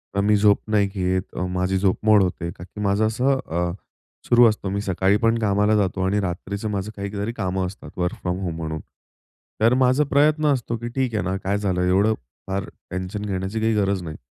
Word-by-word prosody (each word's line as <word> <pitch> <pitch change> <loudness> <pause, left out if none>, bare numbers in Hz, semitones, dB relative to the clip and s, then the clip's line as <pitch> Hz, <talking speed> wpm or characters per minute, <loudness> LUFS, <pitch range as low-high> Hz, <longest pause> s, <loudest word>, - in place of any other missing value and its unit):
अ, - - +1
मी 105 +1 +3
झोप 100 0 +4
नाही 105 -2 +3
घेत, 95 -1 0
अ, 90 - -1
माझी 95 +1 +1
झोप 95 0 +2
मोड 105 -2 +6
होते 90 -2 -2
कारण 85 - -11
की 105 - -5
माझं 100 +2 +2
असं 130 +5 +1
अ, 85 +1 -1 0.6
सुरु 120 0 +6
असतो. 105 -2 -3
मी 100 +1 -2
सकाळी 95 0 +2
पण 115 0 +3
कामाला 105 0 +2
जातो 95 -2 0
आणि 100 +2 +1
रात्रीचं 100 +3 -3
माझं 100 +1 -3
काहीतरी 100 +2 -3
कामं 95 -4 -1
असतात 100 +2 -11
वर्क 90 0 -1
फ्रॉम 90 0 -2
होम 85 -3 -3
म्हणून. 80 -1 -4 0.8
तर 115 +2 +5
माझा 130 +2 +3
प्रयत्न 150 +2 +3
असतो 120 -3 -2
की 120 +1 -6
ठीक 130 -3 0
आहे 105 - 0
ना, 95 +1 -1
काय 100 +2 0
झालं? 95 -3 -1
एवढं 95 +4 +3 0.3
फार 95 0 -2 0.3
टेन्शन 95 +3 -4
घेण्याची 95 +2 -2
काही 110 +1 +2
गरज 100 -2 +1
नाही. 80 -2 -7
100 Hz, 205 wpm, -23 LUFS, 95-110 Hz, 0.8 s, मोड